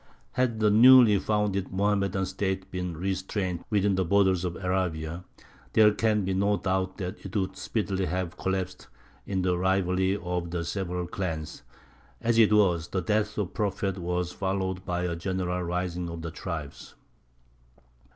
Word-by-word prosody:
Had 125 -3 0
the 105 -1 +4
newly 115 -2 +8
founded 105 -3 -1
Mohammedan 100 0 +1
State 95 0 -3
been 90 -3 -4
restrained 95 0 -2
within 100 -1 +2
the 95 0 +1
borders 95 0 +3
of 90 -1 -2
Arabia, 90 -2 -2 0.5
there 105 -1 +6
can 105 -2 +1
be 95 - 0
no 100 +2 +2
doubt 95 0 -1
that 90 -2 -6
it 95 +2 -8
would 95 -2 -1
speedily 95 -4 -2
have 90 0 -3
collapsed 95 -1 -3 0.4
in 95 -2 -1
the 90 -1 +2
rivalry 95 +1 +1
of 90 -2 -3
the 85 -1 -3
several 90 -1 -3
clans; 80 -3 -4 0.6
as 115 0 +2
it 110 -2 +6
was, 90 -6 +3
the 95 - -2
death 105 -1 +1
of 100 -4 -1
the - - -26
Prophet 100 -2 -1
was 90 0 -2
followed 95 0 -2
by 90 -1 -1
a 85 -1 -1
general 90 0 -2
rising 90 0 -2
of 85 -1 -7
the 80 - -4
tribes. 75 -6 -7
95 Hz, 160 wpm, -27 LUFS, 90-100 Hz, 0.6 s, newly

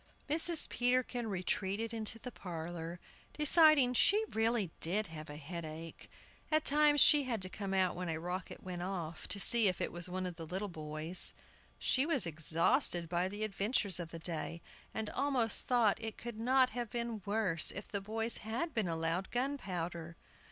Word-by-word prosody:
Mrs. 325 +2 +3
Peterkin 245 -1 0
retreated 200 +3 -2
into 225 0 -4
the 250 +2 -8
parlor, 170 -2 -7 0.3
deciding 300 -4 +4
she 420 - +4
really 220 -5 0
did 200 +6 +1
have 155 -3 -9
a 145 - -8
headache. 160 +1 -9 0.4
At 310 0 +1
times 295 0 +4
she 295 -2 +9
had 235 -4 -2
to 185 - -2
come 195 0 -6
out 190 -2 +1
when 180 -1 -5
a 160 - -2
rocket 180 +3 -6
went 180 -1 -6
off, 175 -3 -5
to 200 - -1
see 230 +1 +8
if 185 - 0
it - - -2
was 175 +1 -4
one 185 +1 -4
of 180 -2 -6
the 165 - -7
little 190 +5 -4
boys. 155 +1 -1 0.4
She 265 +3 +1
was 300 - +2
exhausted 165 - 0
by 175 +1 0
the 205 +3 -5
adventures 200 -2 0
of 170 -2 -6
the 165 - -8
day, 165 0 -5 0.3
and 220 -1 -4
almost 255 -6 +2
thought 230 -4 +2
it 225 -1 -6
could 235 -2 -8
not 255 +2 +3
have 240 -2 -4
been 235 -2 -4
worse 200 -5 +2
if 200 - -3
the 200 - -3
boys 225 +3 -3
had 245 +9 -4
been 220 -5 -1
allowed 165 +3 -2
gunpowder. 180 - -4
200 Hz, 175 wpm, -33 LUFS, 170-240 Hz, 0.4 s, she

